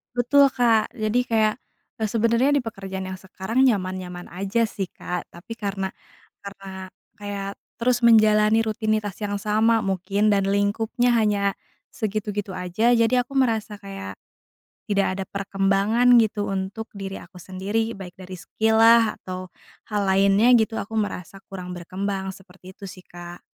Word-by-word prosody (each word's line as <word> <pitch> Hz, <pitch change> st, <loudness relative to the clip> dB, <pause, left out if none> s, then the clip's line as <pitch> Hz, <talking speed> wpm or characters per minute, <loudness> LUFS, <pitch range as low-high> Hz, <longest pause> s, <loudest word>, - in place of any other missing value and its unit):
Betul 280 Hz, +4 st, +5 dB
Kak, 230 Hz, -2 st, +2 dB
jadi 220 Hz, 0 st, 0 dB
kayak, 220 Hz, -3 st, +2 dB, 0.4 s
eee, 220 Hz, -, -1 dB
sebenarnya, 230 Hz, +6 st, +2 dB
di 285 Hz, -, +2 dB
pekerjaan 195 Hz, -4 st, -6 dB
yang 185 Hz, -, -6 dB
sekarang 195 Hz, +7 st, -1 dB
nyaman-nyaman 185 Hz, -5 st, -2 dB
aja 195 Hz, +6 st, -1 dB
sih 195 Hz, -2 st, -3 dB
Kak. 180 Hz, 0 st, -6 dB
Tapi 210 Hz, +7 st, -10 dB
karena 195 Hz, -2 st, -3 dB, 0.6 s
karena 195 Hz, -1 st, -8 dB, 0.3 s
kayak, 200 Hz, -1 st, -5 dB, 0.3 s
terus 245 Hz, 0 st, +1 dB
menjalani 215 Hz, -1 st, +5 dB
rutinitas 215 Hz, -2 st, -1 dB
yang 205 Hz, -1 st, -3 dB
sama 220 Hz, +2 st, +2 dB
mungkin, 195 Hz, +2 st, 0 dB
dan 200 Hz, -1 st, +2 dB
lingkupnya 215 Hz, +5 st, +1 dB
hanya 200 Hz, -2 st, +1 dB, 0.3 s
segitu-gitu 210 Hz, -2 st, -3 dB
aja, 185 Hz, +7 st, +1 dB
jadi 240 Hz, +2 st, +3 dB
aku 275 Hz, -, -13 dB
merasa 220 Hz, -5 st, 0 dB
kayak 195 Hz, -, -8 dB, 0.7 s
tidak 200 Hz, -1 st, +2 dB
ada 190 Hz, -, -2 dB
perkembangan 195 Hz, +4 st, +1 dB
gitu, 210 Hz, -2 st, -1 dB
untuk 195 Hz, +4 st, -4 dB
diri 195 Hz, -1 st, -6 dB
aku 180 Hz, +2 st, -16 dB
sendiri, 205 Hz, +5 st, -3 dB
baik 180 Hz, -2 st, -9 dB
dari 185 Hz, 0 st, -8 dB
skill 220 Hz, +5 st, 0 dB
lah, 230 Hz, -1 st, +5 dB
atau 185 Hz, 0 st, -7 dB, 0.4 s
hal 210 Hz, -2 st, -1 dB
lainnya 200 Hz, +5 st, +4 dB
gitu, 220 Hz, 0 st, 0 dB
aku 205 Hz, -, -5 dB
merasa 195 Hz, -2 st, -4 dB
kurang 180 Hz, -2 st, -7 dB
berkembang. 190 Hz, +2 st, -4 dB
Seperti 185 Hz, 0 st, -15 dB
itu 200 Hz, -, -12 dB
sih 185 Hz, -, -12 dB
Kak. 175 Hz, 0 st, -10 dB
205 Hz, 145 wpm, -23 LUFS, 190-225 Hz, 0.7 s, Betul